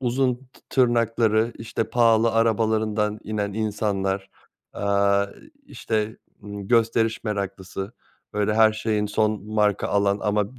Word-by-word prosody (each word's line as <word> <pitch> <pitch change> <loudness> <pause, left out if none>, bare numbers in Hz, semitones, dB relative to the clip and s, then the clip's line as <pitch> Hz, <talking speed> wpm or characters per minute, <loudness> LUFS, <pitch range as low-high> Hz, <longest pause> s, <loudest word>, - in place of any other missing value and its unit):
uzun 125 0 +1
tı 130 +1 -20
tırnakları, 115 -2 +2
işte, 115 0 -3
pahalı 115 -1 +4
arabalarından 110 -1 +1
inen 105 -1 -2
insanlar, 100 -2 -2 0.5
eee, - - -6 0.9
i - - -22
işte, 110 -1 -2 0.2
ımm, 100 -1 -8
gösteriş 115 -1 +2
meraklısı, 100 -1 -4 0.4
böyle, 105 0 0
her 110 -1 +5
şeyin 105 -1 -1
son 105 -1 0
marka 105 -2 +1
alan 100 0 +2
ama 105 +3 0
b - - -16
110 Hz, 125 wpm, -24 LUFS, 105-115 Hz, 0.9 s, her